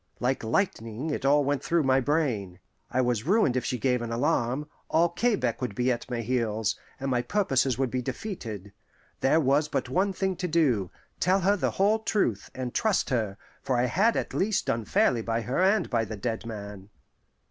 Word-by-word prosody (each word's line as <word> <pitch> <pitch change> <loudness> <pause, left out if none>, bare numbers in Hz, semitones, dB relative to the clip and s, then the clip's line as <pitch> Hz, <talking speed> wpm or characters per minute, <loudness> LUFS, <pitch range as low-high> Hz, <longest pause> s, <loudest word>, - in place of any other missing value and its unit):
Like 125 +1 0
lightning 115 - -1
it 140 - -3
all 145 +1 +4
went 140 0 -1
through 170 -2 +2
my 135 0 +3
brain. 125 - -1 0.3
I 130 - +1
was 120 -3 0
ruined 190 - +3
if 130 - 0
she 125 - -2
gave 125 0 +1
an 115 -1 -4
alarm: 125 +3 0 0.2
all 170 +2 +3
Quebec 175 - 0
would 125 -6 -3
be 125 +1 +1
at 120 - -4
my 120 -2 -2
heels, 110 -3 0 0.2
and 135 0 -2
my 125 -1 +2
purposes 135 - +1
would 130 -2 0
be 130 - -1
defeated. 115 - -6 0.5
There 145 +4 +3
was 145 +1 +2
but 130 - -2
one 190 +8 +1
thing 190 0 -1
to 180 - -2
do 135 - +2 0.3
tell 185 +3 +3
her 200 +3 +3
the 200 - 0
whole 210 +3 +3
truth, 200 - 0
and 125 -2 -4
trust 215 -8 +1
her; 110 -5 -1 0.2
for 130 - 0
I 120 - +2
had 195 - +2
at - - -3
least 205 +1 0
done 115 -1 -1
fairly 135 - +2
by 115 +1 -1
her 125 +9 -1
and 195 -1 +3
by 115 -2 +1
the 110 0 -6
dead 115 +2 -3
man. 100 -3 -8
130 Hz, 200 wpm, -27 LUFS, 115-170 Hz, 0.5 s, all